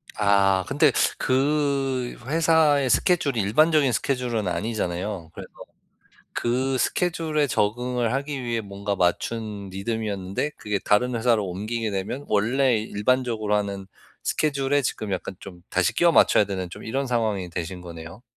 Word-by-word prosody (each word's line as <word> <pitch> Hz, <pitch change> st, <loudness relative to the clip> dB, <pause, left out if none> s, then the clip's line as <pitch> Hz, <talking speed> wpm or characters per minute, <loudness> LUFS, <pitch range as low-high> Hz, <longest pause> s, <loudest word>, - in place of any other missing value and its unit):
아, 100 Hz, -2 st, +3 dB
근데 145 Hz, +2 st, +4 dB, 0.3 s
그 135 Hz, -2 st, 0 dB
회사의 155 Hz, -2 st, +3 dB
스케줄이 140 Hz, -1 st, +2 dB
일반적인 145 Hz, +7 st, +3 dB
스케줄은 120 Hz, -4 st, -1 dB
아니잖아요. 90 Hz, -2 st, -3 dB
그래서 -, -, -9 dB, 0.8 s
그 130 Hz, +3 st, 0 dB
스케줄에 160 Hz, -1 st, 0 dB
적응을 120 Hz, +1 st, 0 dB
하기 140 Hz, 0 st, -3 dB
위해 115 Hz, -2 st, -1 dB
뭔가 100 Hz, 0 st, -4 dB
맞춘 100 Hz, +3 st, -1 dB
리듬이었는데 100 Hz, +4 st, -3 dB
그게 105 Hz, -2 st, -2 dB
다른 125 Hz, +6 st, +2 dB
회사로 115 Hz, -3 st, +2 dB
옮기게 110 Hz, +5 st, -3 dB
되면 100 Hz, +9 st, -4 dB
원래 120 Hz, +4 st, +2 dB
일반적으로 110 Hz, 0 st, 0 dB
하는 100 Hz, -2 st, -2 dB, 0.4 s
스케줄에 145 Hz, -1 st, +1 dB
지금 110 Hz, -4 st, -3 dB
약간 95 Hz, 0 st, -4 dB
좀 90 Hz, -3 st, -11 dB
다시 95 Hz, -2 st, +1 dB
끼워 175 Hz, 0 st, +4 dB
맞춰야 105 Hz, -, +5 dB
되는 95 Hz, -2 st, -4 dB
좀 -, -, -10 dB
이런 135 Hz, +4 st, -2 dB
상황이 110 Hz, -7 st, -1 dB
되신 90 Hz, +1 st, -5 dB
거네요. 85 Hz, +4 st, -10 dB
115 Hz, 325 characters per minute, -24 LUFS, 100-135 Hz, 0.8 s, 맞춰야